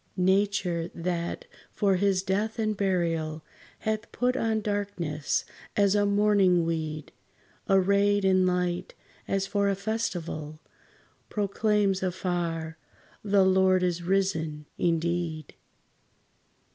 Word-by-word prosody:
Nature, 185 -2 +1
that, 175 - -3 0.3
for 195 -3 +2
his 195 -1 +1
death 210 +4 -1
and 215 -1 0
burial, 165 -5 -1 0.4
Hath 220 +1 -2
put 250 +1 0
on 225 -2 0
darkness, 200 -8 -2 0.3
as 200 -1 +4
a 205 0 +2
mourning 200 -4 +3
weed, 155 -2 -3 0.6
Arrayed 200 +1 +3
in 185 -1 +4
light 180 0 -1 0.3
as 195 0 0
for 200 0 +1
a 195 - +1
festival, 175 -8 -4 0.7
Proclaims 205 -1 +1
afar, 170 -3 -2 0.4
"The 200 -2 +4
Lord 190 -1 +4
is 175 -1 0
risen 165 -5 -1
indeed!" 170 -2 -1
190 Hz, 105 wpm, -27 LUFS, 170-200 Hz, 0.7 s, as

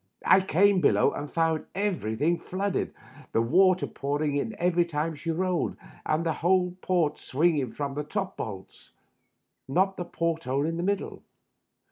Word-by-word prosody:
I 190 - +6
came 190 +1 +3
below - - +4
and 145 0 -6
found 165 -1 +1
everything 170 - 0
flooded, 195 +1 -2 0.4
the 115 - +3
water 185 +8 +4
pouring 145 +1 -2
in 210 +10 -2
every 175 0 +2
time 160 -1 -2
she 155 +3 -6
rolled, 180 +1 -1 0.3
and 155 +2 +1
the 165 - +1
whole 180 +2 +1
port 165 -5 +1
swinging 145 -3 +1
from 140 -1 -4
the 150 +2 -3
top 190 +5 -3
bolts 95 -4 -8 0.4
— - - -51 0.3
not 190 +8 +1
the 175 - -3
port 165 -1 -2
hole 135 +3 0
in 165 +1 -2
the - - -2
middle. 200 +2 -2
165 Hz, 160 wpm, -27 LUFS, 145-185 Hz, 0.4 s, I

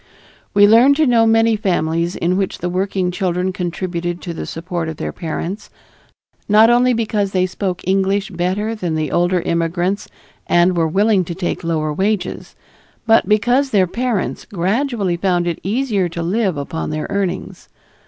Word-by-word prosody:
We 205 0 +7
learned 240 +6 +6
to 310 +1 +3
know 230 -3 +4
many 225 0 +4
families 170 -4 -1
in 175 +2 0
which 195 0 -1
the 175 - -3
working 185 0 -1
children 180 0 -1
contributed 175 -1 -3
to 170 - -5
the - - -6
support 170 0 -4
of 160 - -7
their - - -4
parents, 175 +4 -5 0.8
not 215 +3 +6
only 245 +1 +4
because 215 -4 -1
they 185 -1 +2
spoke 185 -1 -4
English 195 +1 +1
better 190 +5 -1
than 180 -7 -3
the 155 -2 -2
older 175 +1 +1
immigrants 175 +4 -1 0.4
and 175 +1 +3
were 165 -1 +2
willing 200 +3 +2
to 170 - -5
take 180 -1 -3
lower 155 -2 -1
wages, 200 +4 -2 0.5
but 225 -3 +3
because 245 +6 +2
their 200 -6 +3
parents 230 +2 -2
gradually 200 0 -1
found 175 -1 +1
it 170 -2 -2
easy 210 -3 0
to 170 0 -5
live 190 -1 0
upon 145 +3 -4
their 155 0 -3
earnings. 195 -3 -3
185 Hz, 165 wpm, -18 LUFS, 175-215 Hz, 0.8 s, We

